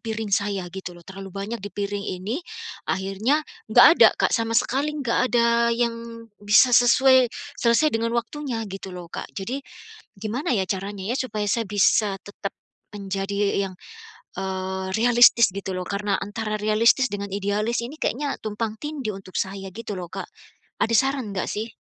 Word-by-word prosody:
piring 220 -2 -4
saya 200 -3 -1
gitu 190 -2 -7
loh, 175 - -14
terlalu 195 0 -9
banyak 205 +4 -4
di - - -5
piring 205 0 -3
ini, 205 - -3 0.5
akhirnya 195 +10 0 0.3
enggak - - +9
ada, - - +9
Kak, - - +2
sama 230 -1 0
sekali 270 +4 -1
enggak 255 -3 0
ada 235 0 +3
yang 230 -1 -3 0.2
bisa 215 +5 +6
sesuai, 260 +1 +6 0.3
selesai 235 +6 +3
dengan 230 +1 0
waktunya 240 0 -3
gitu 195 0 -7
loh, 175 -1 -9
Kak. - - -5
Jadi 235 +8 -3 0.6
gimana 230 +6 -2
ya 200 - +2
caranya 195 0 -3
ya - - -1
supaya 215 -5 -2
saya 230 +2 +1
bisa 205 0 +2
tetap 205 -1 -7 0.4
menjadi 200 0 -1
yang, 185 - -7 0.6
eee, 190 0 -3
realistis 235 -2 +6
gitu 195 0 -5
loh? 185 - -3
Karena 200 0 -1
antara 215 +2 -4
realistis 230 +5 +4
dengan 200 0 -4
idealis 205 +4 0
ini 265 +6 -7
kayaknya 280 +1 -1
tumpang 215 0 -3
tindih 285 -8 -4
untuk 190 -1 -13
saya 195 0 -3
gitu 215 -2 -6
loh, 180 - -5
Kak. - - -6 0.5
Ada 230 - +2
saran 265 -4 +1
nggak 185 - -2
sih? 220 +2 -4
215 Hz, 160 wpm, -24 LUFS, 195-235 Hz, 0.6 s, enggak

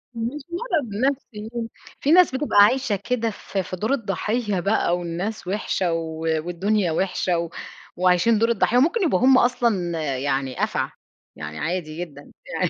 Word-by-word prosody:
مش 240 +6 -3
مرض 345 - -1 0.2
نَفسي، 230 -6 -3 0.5
في 290 - +2
ناس 355 -6 +6
بتبقى 280 -6 0
عايشة 235 -1 +2
كده 230 -2 +1
في 195 -1 -4
في 185 - -6
دور 215 +8 -2
الضحية 210 -2 -1
بقى، 180 -2 +1
والناس 180 +4 -4
وحشة 185 -3 -1
و 160 -1 -4 0.3
والدنيا 185 +1 0
وحشة، 180 0 0
و 170 -1 -3 0.5
وعايشين 185 +5 +3
دور 230 +1 +3
الضحية، 235 +2 +2
وممكن 340 - +3
يبقوا 290 - +2
هُم 260 +1 +6
أصلًا 210 -10 +1 0.2
يعني 135 -1 -1
أفعى، - - -1 0.5
يعني 75 0 -7
عادي 165 -3 -3
جدًا، 145 -4 -9
يعني - - -1
205 Hz, 150 wpm, -23 LUFS, 175-245 Hz, 0.5 s, ناس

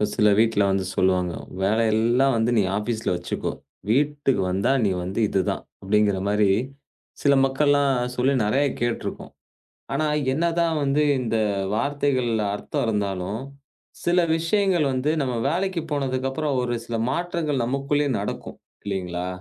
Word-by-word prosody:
சில 105 0 +4
வீட்டுல 110 -2 +3
வந்து 95 -1 0
சொல்லுவாங்க. 90 -2 +1 0.3
வேலை 110 +4 +2
எல்லாம் 120 +5 +3
வந்து 115 +2 +1
நீ 105 - +4
ஆபீஸ்ல 110 +1 -2
வச்சுக்கோ. 85 0 -3 0.4
வீட்டுக்கு 140 -2 +1
வந்தா, 95 +7 +1
நீ - - +3
வந்து 95 +5 -3
இது 100 - 0
தான்! - - -3 0.2
அப்படிங்கற 100 0 +2
மாரி 105 0 +3 0.7
சில 140 - +4
மக்கள் 135 +2 +1
எல்லாம் 145 -1 +3 0.2
சொல்லி 130 +3 +2
நெறைய 135 +7 +2 0.2
கேட்டுருப்போம். 120 -1 -3 0.6
ஆனா, 155 +3 0 0.3
என்னதான் 165 +2 +1
வந்து 140 +2 +2 0.2
இந்த 115 -2 -1 0.4
வார்த்தைகள்ல 125 -3 0
அர்த்தம் 105 - -3
இருந்தாலும் 100 -1 -2 0.6
சில 175 +1 +2 0.2
விஷயங்கள் 175 0 +1
வந்து 130 +4 0
நம்ம 130 -3 -1
வேலைக்கு 185 0 -1
போனதுக்கு 135 -2 -1
அப்புறம் 145 0 -1
ஒரு 120 -1 -1
சில 115 - -3
மாற்றங்கள் 165 -4 -1
நமக்குள்ளே 140 +3 0
நடக்கும். 100 - -5 0.3
இல்லைங்களா? 90 -3 -3
125 Hz, 135 wpm, -24 LUFS, 105-145 Hz, 0.7 s, சில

